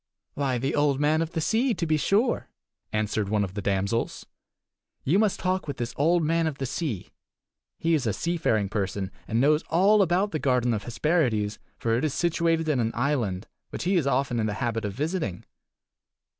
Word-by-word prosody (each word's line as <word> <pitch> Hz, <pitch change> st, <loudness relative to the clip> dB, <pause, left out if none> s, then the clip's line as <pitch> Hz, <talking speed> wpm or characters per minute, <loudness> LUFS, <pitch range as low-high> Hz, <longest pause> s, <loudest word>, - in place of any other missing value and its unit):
"Why, 135 Hz, -3 st, 0 dB
the 135 Hz, +3 st, -1 dB
Old 145 Hz, -2 st, +2 dB
Man 155 Hz, +2 st, +2 dB
of 165 Hz, 0 st, -3 dB
the 160 Hz, -, -1 dB
Sea, 230 Hz, -, +1 dB
to 170 Hz, -, -2 dB
be 155 Hz, -1 st, +2 dB
sure," 210 Hz, -, +1 dB, 0.4 s
answered 105 Hz, -1 st, -1 dB
one 105 Hz, -1 st, +2 dB
of 95 Hz, -2 st, -4 dB
the 100 Hz, -, -4 dB
damsels. 100 Hz, +4 st, -1 dB, 0.8 s
"You 170 Hz, +9 st, +3 dB
must 215 Hz, -3 st, +2 dB
talk 185 Hz, -2 st, -1 dB
with 140 Hz, -, -4 dB
this 120 Hz, 0 st, -3 dB
Old 165 Hz, +4 st, +3 dB
Man 165 Hz, +1 st, +2 dB
of 150 Hz, -3 st, -3 dB
the 135 Hz, -, -3 dB
Sea. 130 Hz, -, -4 dB, 0.7 s
He 165 Hz, 0 st, +1 dB
is 140 Hz, -7 st, +1 dB
a -, -, +2 dB
seafaring 135 Hz, -, 0 dB
person, 95 Hz, -1 st, -2 dB, 0.2 s
and 115 Hz, 0 st, 0 dB
knows 150 Hz, +4 st, +4 dB
all 200 Hz, +5 st, +5 dB
about 190 Hz, +3 st, +2 dB
the 155 Hz, -, -2 dB
garden 125 Hz, -3 st, +2 dB
of 105 Hz, -, -3 dB
Hesperides, 120 Hz, -6 st, 0 dB, 0.2 s
for 115 Hz, -1 st, 0 dB
it 120 Hz, -, -1 dB
is 150 Hz, -3 st, 0 dB
situated 165 Hz, -1 st, +1 dB
in 150 Hz, -4 st, +1 dB
an 115 Hz, -1 st, 0 dB
island, 115 Hz, -7 st, -1 dB, 0.2 s
which -, -, -5 dB
he 190 Hz, +2 st, +1 dB
is 160 Hz, -6 st, +2 dB
often 135 Hz, -2 st, +1 dB
in 110 Hz, -, +1 dB
the 105 Hz, -, -2 dB
habit 115 Hz, -1 st, -2 dB
of 100 Hz, -, -3 dB
visiting." 150 Hz, -, -3 dB
140 Hz, 200 wpm, -26 LUFS, 110-165 Hz, 0.8 s, all